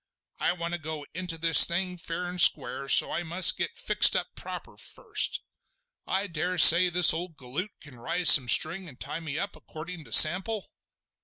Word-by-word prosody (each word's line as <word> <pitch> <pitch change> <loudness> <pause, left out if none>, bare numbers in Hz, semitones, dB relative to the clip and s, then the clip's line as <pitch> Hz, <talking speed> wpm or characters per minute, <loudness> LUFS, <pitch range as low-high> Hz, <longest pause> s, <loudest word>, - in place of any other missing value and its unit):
I - - -3
want 170 -1 -9
to 175 - -6
go 155 -1 -10
into 175 -1 -7
this 165 0 +5
thing 180 +1 -6
fair 170 +1 -9
and 180 0 -4
square, 135 -2 0
so - - +1
I - - -6
must 175 +2 +1
get - - -7
fixed - - +2
up - - -4
proper - - -12
first. 425 -3 -4 0.6
I 195 +2 -4
dare 180 0 -7
say 170 +3 +7
this 175 -2 +4
old 165 -1 -9
galoot 140 +10 -9
can 135 -5 -18
rise 170 +6 +1
some 130 -4 +4
string 175 +7 0
and 130 - -20
tie 160 - -7
me 155 -3 -9
up 200 +4 -7
accordin' 165 +1 -13
to 115 - -19
sample?" 185 - +3
170 Hz, 185 wpm, -23 LUFS, 155-180 Hz, 0.6 s, say